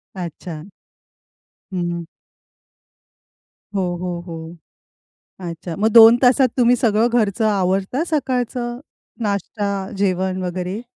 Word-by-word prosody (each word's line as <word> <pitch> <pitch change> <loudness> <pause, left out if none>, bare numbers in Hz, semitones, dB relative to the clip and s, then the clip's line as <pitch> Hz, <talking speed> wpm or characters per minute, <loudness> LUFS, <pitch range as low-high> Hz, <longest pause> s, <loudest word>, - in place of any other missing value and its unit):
अच्छा. 170 -1 -7 1.0
हं. 175 -1 -2 1.7
हो, 195 - +1 0.2
हो, 180 -1 -3
हो. 165 0 -8 0.9
अच्छा. 165 0 -6
मग 220 +2 +3
2 230 0 +10
तासात 255 +1 +5
तुम्ही 245 0 +5
सगळं 225 -1 +2
घरचं 215 +1 0
आवरता 195 - 0
सकाळचं 250 -5 -2 0.4
नाष्टा, 205 0 -2 0.3
जेवण 185 -1 0
वगैरे? 180 +4 -4
200 Hz, 95 wpm, -20 LUFS, 180-235 Hz, 1.7 s, 2